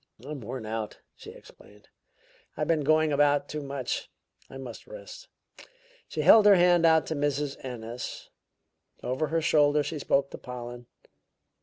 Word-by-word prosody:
"I'm 145 Hz, -1 st, -6 dB
worn 115 Hz, +1 st, -6 dB
out," 110 Hz, 0 st, -4 dB, 0.2 s
she -, -, -12 dB
explained. 105 Hz, 0 st, -17 dB, 0.7 s
"I've -, -, -1 dB
been 165 Hz, -2 st, +2 dB
going 155 Hz, +1 st, +3 dB
about 145 Hz, 0 st, +3 dB
too 150 Hz, -, -5 dB
much. 140 Hz, -2 st, -4 dB, 0.4 s
I 135 Hz, -, -9 dB
must 130 Hz, -3 st, -9 dB
rest." -, -, -11 dB, 0.8 s
She -, -, -3 dB
held 215 Hz, -2 st, +7 dB
her 205 Hz, -, +8 dB
hand 175 Hz, -2 st, +5 dB
out 160 Hz, -1 st, +4 dB
to 160 Hz, -, -3 dB
Mrs. 145 Hz, -1 st, -2 dB
Ennis; 120 Hz, -1 st, -7 dB, 0.7 s
over 130 Hz, +5 st, -1 dB
her 165 Hz, +2 st, -1 dB
shoulder 150 Hz, -1 st, +3 dB
she 150 Hz, +2 st, -4 dB
spoke 140 Hz, 0 st, +1 dB
to -, -, -8 dB
Pollen. 120 Hz, -1 st, -8 dB
145 Hz, 150 wpm, -27 LUFS, 125-160 Hz, 0.8 s, her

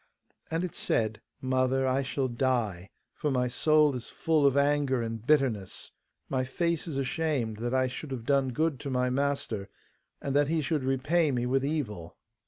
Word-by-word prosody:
And 165 Hz, +2 st, -1 dB
it 180 Hz, -, -3 dB
said, 110 Hz, -1 st, 0 dB, 0.2 s
'Mother, 130 Hz, 0 st, +1 dB
I 130 Hz, +1 st, +2 dB
shall 135 Hz, 0 st, -1 dB
die, 120 Hz, -7 st, -1 dB, 0.2 s
for 150 Hz, -, -2 dB
my 125 Hz, -2 st, +1 dB
soul 150 Hz, +3 st, +3 dB
is 125 Hz, -, -6 dB
full 155 Hz, -3 st, +2 dB
of 140 Hz, 0 st, +2 dB
anger 140 Hz, -3 st, +2 dB
and 115 Hz, -1 st, -4 dB
bitterness. 125 Hz, -9 st, +1 dB, 0.4 s
My 130 Hz, -1 st, 0 dB
face 170 Hz, +5 st, -1 dB
is 150 Hz, -5 st, -3 dB
ashamed, 135 Hz, -5 st, -1 dB
that 120 Hz, +3 st, -2 dB
I 130 Hz, 0 st, +3 dB
should 130 Hz, +4 st, -5 dB
have 125 Hz, -4 st, -5 dB
done 135 Hz, 0 st, +2 dB
good 155 Hz, +2 st, 0 dB
to 140 Hz, -, -5 dB
my 125 Hz, -1 st, +1 dB
master, 130 Hz, -7 st, -1 dB, 0.5 s
and 140 Hz, 0 st, -3 dB
that 145 Hz, 0 st, +4 dB
he 160 Hz, +1 st, +1 dB
should 150 Hz, -1 st, -1 dB
repay 145 Hz, +5 st, +2 dB
me 125 Hz, -3 st, 0 dB
with 135 Hz, +2 st, +1 dB
evil. 125 Hz, -, -3 dB
135 Hz, 180 wpm, -29 LUFS, 125-145 Hz, 0.5 s, that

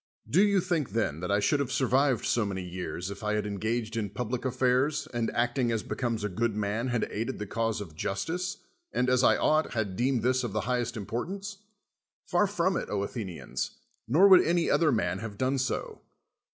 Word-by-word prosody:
Do 155 Hz, +12 st, +4 dB
you 200 Hz, -2 st, +3 dB
think, 170 Hz, -7 st, -1 dB
then, 105 Hz, -10 st, 0 dB
that 90 Hz, -, -4 dB
I 100 Hz, -, +3 dB
should 145 Hz, +7 st, +2 dB
have 135 Hz, -2 st, -1 dB
sur 130 Hz, -, +1 dB
vived 130 Hz, -1 st, +2 dB
so 120 Hz, -, +2 dB
many 95 Hz, -2 st, -3 dB
years 90 Hz, +1 st, -5 dB
if 100 Hz, -, -8 dB
I 105 Hz, 0 st, 0 dB
had 105 Hz, -, -1 dB
engaged 110 Hz, +3 st, -2 dB
in 105 Hz, -3 st, -1 dB
public 125 Hz, +4 st, -3 dB
affairs, 130 Hz, +3 st, +1 dB
and, 120 Hz, -1 st, 0 dB
acting 120 Hz, +1 st, +1 dB
as 110 Hz, -2 st, -1 dB
becomes 115 Hz, -4 st, -2 dB
a -, -, +1 dB
good 110 Hz, +3 st, -1 dB
man, 105 Hz, +4 st, -1 dB
had 120 Hz, -2 st, 0 dB
aided 115 Hz, +2 st, -3 dB
the 105 Hz, -, -4 dB
cause 115 Hz, +1 st, -1 dB
of 95 Hz, -6 st, -7 dB
justice, 165 Hz, -, -3 dB, 0.3 s
and, 125 Hz, 0 st, +1 dB
as 125 Hz, 0 st, +3 dB
I -, -, +5 dB
ought, 155 Hz, +1 st, +2 dB
had 105 Hz, -5 st, -2 dB
deemed 125 Hz, +1 st, +1 dB
this 130 Hz, +1 st, +2 dB
of 115 Hz, -5 st, -3 dB
the 110 Hz, -, 0 dB
highest 120 Hz, +1 st, -1 dB
importance? 195 Hz, -, -4 dB, 0.7 s
Par 180 Hz, +3 st, +4 dB
from 190 Hz, -2 st, +1 dB
it, -, -, -4 dB
Athenians: 100 Hz, -3 st, -4 dB, 0.3 s
nor 160 Hz, -, +6 dB
would 190 Hz, -2 st, +9 dB
any 170 Hz, 0 st, +1 dB
other 160 Hz, -3 st, +4 dB
man 95 Hz, -6 st, 0 dB
have 105 Hz, -2 st, -7 dB
done 130 Hz, +3 st, +1 dB
so. 130 Hz, -2 st, -3 dB
120 Hz, 205 wpm, -29 LUFS, 105-135 Hz, 0.7 s, would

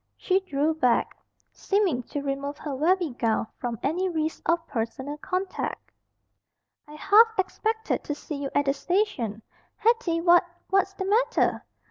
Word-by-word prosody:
She 375 Hz, 0 st, +2 dB
drew 310 Hz, -4 st, 0 dB
back, 250 Hz, -7 st, +1 dB, 0.4 s
seeming 390 Hz, -11 st, 0 dB
to 285 Hz, -, -4 dB
remove 280 Hz, +1 st, -3 dB
her 290 Hz, -3 st, -5 dB
very 340 Hz, +3 st, +2 dB
gown 225 Hz, -2 st, 0 dB
from 240 Hz, -2 st, -3 dB
any 360 Hz, +6 st, 0 dB
risk 315 Hz, -2 st, -2 dB
of 335 Hz, 0 st, +2 dB
personal 265 Hz, +4 st, -4 dB
contact. 370 Hz, +4 st, -4 dB, 1.0 s
"I 300 Hz, -, -12 dB
half 445 Hz, +7 st, +5 dB
expected 440 Hz, +3 st, -1 dB
to 295 Hz, -, -3 dB
see 300 Hz, 0 st, -6 dB
you 275 Hz, -, -2 dB
at 285 Hz, -, +3 dB
the 275 Hz, -, +2 dB
station. 285 Hz, -, -1 dB, 0.3 s
Hetty, 445 Hz, -7 st, +2 dB
what 345 Hz, +1 st, +6 dB, 0.3 s
what's 390 Hz, 0 st, +2 dB
the 380 Hz, -, -3 dB
matter?" 470 Hz, +5 st, +2 dB
325 Hz, 145 wpm, -26 LUFS, 280-385 Hz, 1.0 s, what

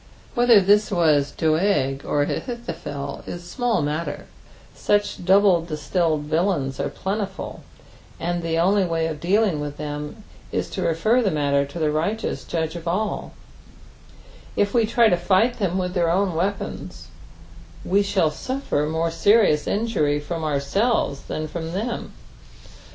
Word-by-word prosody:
Whether 240 Hz, -4 st, +6 dB
this 205 Hz, +2 st, +4 dB
was 155 Hz, -6 st, +3 dB
Doeg 155 Hz, -5 st, +1 dB
or 145 Hz, -, +1 dB
Ahithophel 145 Hz, -, -5 dB
is 175 Hz, 0 st, -7 dB
small 240 Hz, -, 0 dB
matter, 150 Hz, +3 st, -3 dB, 0.5 s
such 205 Hz, -3 st, 0 dB
double 190 Hz, -1 st, +5 dB
distilled 155 Hz, 0 st, -1 dB
villains 155 Hz, -3 st, 0 dB
are -, -, -1 dB
plentiful, 195 Hz, 0 st, -4 dB, 0.6 s
and 175 Hz, +1 st, -2 dB
the 165 Hz, -1 st, -1 dB
only 195 Hz, +4 st, +3 dB
way 165 Hz, -2 st, 0 dB
of 160 Hz, -2 st, -3 dB
dealing 190 Hz, 0 st, +2 dB
with 145 Hz, 0 st, -5 dB
them 150 Hz, +7 st, -6 dB, 0.3 s
is -, -, -2 dB
to -, -, -3 dB
refer 215 Hz, +10 st, +2 dB
the 210 Hz, -, +2 dB
matter 140 Hz, -3 st, +1 dB
to 140 Hz, -, -9 dB
the 155 Hz, -2 st, +1 dB
righteous 200 Hz, +9 st, -2 dB
Judge 160 Hz, -1 st, -2 dB
of 170 Hz, 0 st, -7 dB
all; 205 Hz, +5 st, -2 dB, 1.2 s
if 200 Hz, 0 st, +1 dB
we 230 Hz, -3 st, +3 dB
try 235 Hz, +1 st, +4 dB
lo 180 Hz, -, +3 dB
fight 195 Hz, +8 st, +2 dB
them 190 Hz, -3 st, 0 dB
with 180 Hz, -1 st, -2 dB
their 175 Hz, -3 st, +1 dB
own 185 Hz, +1 st, +1 dB
weapons, 190 Hz, +5 st, -4 dB, 0.8 s
we 200 Hz, +2 st, +3 dB
shall 190 Hz, -6 st, +1 dB
auilTer 155 Hz, -, -2 dB
more 165 Hz, +1 st, 0 dB
serious 175 Hz, -2 st, +3 dB
injiu7 150 Hz, -10 st, 0 dB
from 165 Hz, +1 st, -4 dB
ourselves 145 Hz, -, 0 dB
than 155 Hz, 0 st, -4 dB
from 165 Hz, +1 st, -5 dB
them. 225 Hz, +5 st, -3 dB
170 Hz, 145 wpm, -23 LUFS, 150-205 Hz, 1.2 s, Whether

